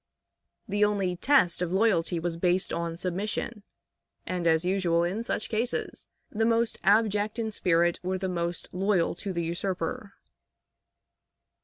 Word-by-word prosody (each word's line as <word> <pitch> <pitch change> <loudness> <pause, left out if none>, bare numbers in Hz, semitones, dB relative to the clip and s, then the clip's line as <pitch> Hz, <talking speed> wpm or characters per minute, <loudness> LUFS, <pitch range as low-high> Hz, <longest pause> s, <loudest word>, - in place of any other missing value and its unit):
The 205 0 +1
only 200 -3 +1
test 180 -5 +3
of 175 -1 -1
loyalty 190 -4 +2
was 170 0 -2
based 180 +2 +1
on 170 0 -3
submission, 205 +5 -3 0.6
and, 180 -2 -2
as 160 +1 +3
usual 180 -3 +2
in 185 +6 -1
such 235 - -3
cases, 230 +3 -3 0.2
the 225 +1 0
most 230 0 +1
abject 210 +1 +2
in 225 -1 -2
spirit 175 -3 +2
were 185 +1 -2
the 190 0 -3
most 170 -1 -2
loyal 190 -1 +1
to 195 +3 -5
the 170 -2 -2
usurper. 175 +3 -3
185 Hz, 140 wpm, -28 LUFS, 170-210 Hz, 0.6 s, test